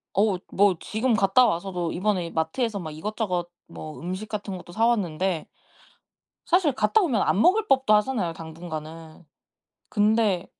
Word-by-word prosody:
어 195 -2 +2
뭐 200 -1 +4
지금 230 +3 -1
갔다 200 +5 +4
와서도 175 -3 -2
이번에 185 -3 -1
마트에서 200 +7 -1
막 160 -4 -6
이것저것 180 +1 -3 0.2
뭐 155 -1 -9
음식 185 +5 -5
같은 205 -3 -5
것도 175 -1 -12
사 225 +3 +2
왔는데 185 -6 0 1.0
사실 350 -4 +3
갔다 240 - +2
오면 260 - +1
안 195 - +2
먹을 420 - +4
법도 265 -5 +3
하잖아요 210 -6 0
당분간은. 160 0 -9 0.7
근데 210 -3 +2
195 Hz, 300 characters per minute, -25 LUFS, 170-220 Hz, 1.0 s, 뭐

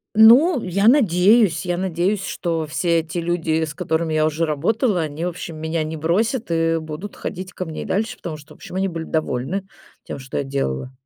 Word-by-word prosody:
Ну, 245 +7 +7
я 200 +4 +3
надеюсь 205 - +4
я 175 -1 -1
надеюсь, 190 +2 -1
что 165 -5 -2
все 170 +2 +1
эти 160 +2 -5
люди, 165 -2 0
с 150 -2 -4
которыми 160 0 -1
я 155 0 +3
уже 155 +2 0
работала, 180 - +1
они, 155 +1 -4
в 180 - 0
общем, 170 -1 -7
меня 160 +1 -2
не 160 - -5
бросят 190 - 0
и 165 0 +2
будут 160 +6 -7
ходить 185 0 -6
ко - - -4
мне 160 -2 -6
и - - -9
дальше, 220 +3 -1
потому 165 -3 -6
что, 150 +1 -13
в - - -19
общем, - - -10
они 190 +1 0
были 165 -2 -5
довольны 155 +5 -2 0.4
тем, - - -7
что 130 0 -6
я - - 0
делала. 130 - -3
170 Hz, 205 wpm, -21 LUFS, 155-195 Hz, 0.4 s, Ну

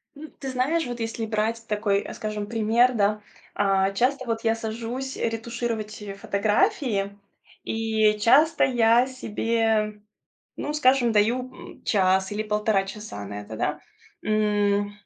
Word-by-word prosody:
М, 305 +2 -10
ты 270 - -5
знаешь, 280 +6 0
вот 240 -1 -5
если 225 0 -3
брать 220 +1 -1
такой, 210 -1 +1
э, - - -8
скажем, 215 -1 -4
пример, 230 +3 +3
да, 210 -1 +1 0.3
а, 195 -1 +2
часто 255 +6 0
вот 230 -1 -2
я 225 0 +2
сажусь 230 +4 -5
ретушировать, 225 -1 -3
э, 205 -1 -6
фотографии, 205 - 0 0.5
и 220 -1 +1
часто 285 +9 +5
я 240 -1 +4
себе, 225 -3 -1 0.6
ну, 295 - -3
скажем, 260 -5 +3
даю, 240 +5 +2
м, - - -13
час 190 -1 +2
или 210 +1 -1
1,5 210 -2 +1
часа 195 - -7
на 100 +1 -6
это, 105 +2 -8
да. - - -2 0.4
М, 205 -1 +1
220 Hz, 140 wpm, -25 LUFS, 205-240 Hz, 0.6 s, часто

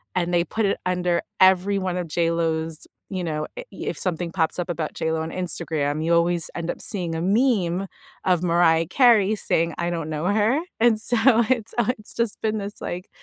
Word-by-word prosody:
and 175 -1 0
they 170 -1 +3
put 220 -1 -1
it 195 - +1
under 180 -1 0 0.2
every 190 +1 +4
one 185 -1 -2
of 175 -2 -3
JLo's, 165 -1 -1 0.2
you 185 -2 -3
know 155 -2 -3
i - - -5
if - - -5
something 175 -2 -2
pops 165 -1 0
up 175 - -2
about 165 -3 -3
JLo 160 0 -1
on 160 +1 -5
Instagram, 160 -4 -1
you 170 - +1
always 170 0 +2
end 170 -1 -4
up - - -9
seeing 175 -6 +1
a 160 - -3
meme 195 -3 +1 0.4
of 180 -2 +2
Mariah 165 -1 +3
Carey 225 -6 +4
saying, 165 -5 0
"I 170 - -1
don't 165 -2 -3
know 155 +1 -3
her." 215 +7 +2 0.2
And 230 -2 +4
so 240 +1 +1 0.3
it's 235 -4 0 0.3
it's 215 - -2
just 230 -3 -1
been 220 0 0
this, 200 +1 -7
like, 180 +2 -5
175 Hz, 195 wpm, -23 LUFS, 165-200 Hz, 0.4 s, every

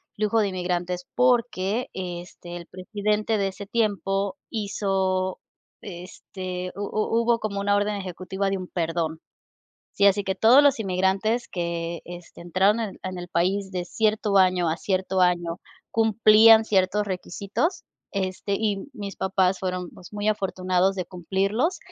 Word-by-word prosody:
flujo 215 +2 +1
de 205 -2 +2
inmigrantes. 180 -1 -3
Porque, 240 -3 +1
este, 175 -1 -7
el 170 -1 -10
presidente 210 +3 -1
de 195 - +1
ese 200 +1 -7
tiempo, 200 -3 0 0.2
hizo, 190 -3 -1 0.4
este, 180 0 -7
hu 200 - -6
hu 215 +2 0
hubo 235 0 +2
como 205 -2 -3
una 205 0 +2
orden 205 +1 +1
ejecutiva 190 +1 -3
de 195 - 0
un 185 -1 -6
perdón. 165 -2 -2 0.7
Sí, 200 - +1
así 200 0 +3
que 190 -1 -1
todos 245 +6 +6
los 280 -5 +4
inmigrantes, 195 +4 0
que, 170 -1 -3
este, 175 -1 -11
entraron 190 +6 +2
en 215 -4 -4
en 185 -1 -4
el 175 - -7
país 190 +3 0
de 180 -2 -3
cierto 215 +1 +1
año 185 -2 +4
a 160 - 0
cierto 190 0 -1
año, 175 -1 +1 0.3
cumplían 220 0 +6
ciertos 205 0 +1
requisitos, 200 - -2 0.3
este, 195 0 -2
y 210 +1 -1
mis 200 -5 -7
papás 190 -1 +1
fueron, 180 -1 -3
pues, 180 - -14
muy 210 0 -1
afortunados 190 -2 +1
de 185 -2 -3
cumplirlos, 195 - -1
195 Hz, 150 wpm, -25 LUFS, 180-210 Hz, 0.7 s, todos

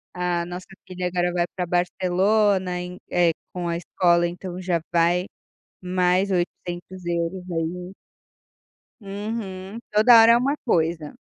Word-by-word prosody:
a 180 -1 0
nossa 180 +1 -7 0.2
filha 180 -1 -3
agora 175 0 0
vai 175 -1 +1
para 180 - -1
Barcelona 185 +2 +1
em, 180 0 -7
eh, 175 -1 +4 0.2
com 175 -1 -3
a 170 - -1
escola 175 0 +2
então 180 +1 -7
já 180 -2 -1
vai 175 +2 +2 0.6
mais 180 +1 +2
€800 175 0 -3
aí. 175 +3 -4 1.1
Uhum. 200 -1 -6
Toda 225 +3 +7
hora 225 +1 +7
é - - +6
uma 275 +4 0
coisa. 165 -7 0
180 Hz, 125 wpm, -23 LUFS, 175-190 Hz, 1.1 s, Toda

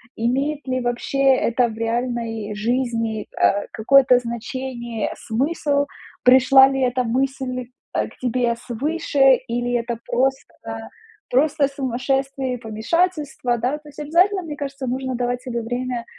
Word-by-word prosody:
имеет 275 +6 -1
ли 255 0 0
вообще 245 +2 -2 0.2
это 240 0 +1
в 220 - -7
реальной 230 -2 -2
жизни, 230 0 -1
а, 200 +1 +3
какое-то 255 +2 +5
значение, 235 -1 -4
смысл. 285 +4 0 0.3
Пришла 265 +1 +7
ли 270 0 -1
эта 255 0 +1
мысль, 255 0 -2 0.2
э, - - +1
к - - -18
тебе 245 -1 0
свыше 270 +2 +2
или 245 +1 -1
это 235 -1 -1
просто, 265 +2 0 0.8
просто 280 +2 +3
сумасшествие 270 0 -2
и - - -3
помешательство, 250 +3 -1
да? 255 +6 -1
То 300 0 -15
есть, 295 +1 -13
обязательно, 360 +6 +2
мне 305 -3 -6
кажется, 275 -2 -5
нужно 260 +1 -2
давать 245 0 -1
себе 235 -2 -4
время, 245 0 -3
255 Hz, 135 wpm, -22 LUFS, 235-275 Hz, 0.8 s, Пришла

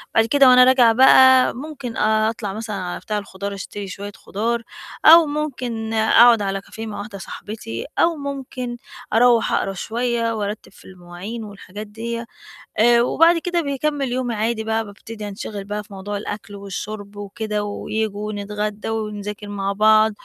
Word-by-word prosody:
بعد 225 - +5
كده 270 +2 +5
وأنا 250 0 +8
راجعة 250 -3 +5
بقى 260 +1 +7
ممكن 275 -4 -7
أطلع 215 -1 0
مثلًا 215 -1 -5
على 180 -2 -4
بتاع 210 -1 -3
الخُضار 200 0 -5
أشتري 200 +1 -7
شوية 200 +2 -7
خُضار 230 +4 -2 0.4
أو 330 +1 +9
ممكن 250 -7 -3
أقعُد 225 +1 +6
على 195 0 -2
كافيه 220 +2 -9
مع 210 - -6
واحدة 205 -1 -7
صاحبتي 190 - -7
أو 335 0 +3
ممكن 265 -4 -5 0.4
أروّح 235 0 +4
أقرا 195 - 0
شوية 230 +3 -1
وأرتِّب 205 -1 -5
في - - -19
المواعين 185 +5 -8
والحاجات 205 0 -9
ديّة 230 +2 -5 0.5
آآ 235 +1 +5
وبعد 330 +7 +4
كده 345 0 -1
باكمِّل 280 -2 -2
يومي 250 -2 -1
عادي 220 +1 -1
بقى، 220 0 -1
بابتدي 210 +1 -9
أنشِغِل 200 0 -6
بقى 210 +1 -4
في 205 -1 -15
موضوع 200 +2 -5
الأكل 205 0 -7
والشُرْب 200 +1 -7
وكده 210 +1 -4
وييجوا 210 0 -3
ونتغدّا 210 +1 -4
ونذاكِر 210 -1 -5
مع 200 -1 -2
بعض. 215 +1 +5
220 Hz, 155 wpm, -21 LUFS, 205-240 Hz, 0.5 s, أو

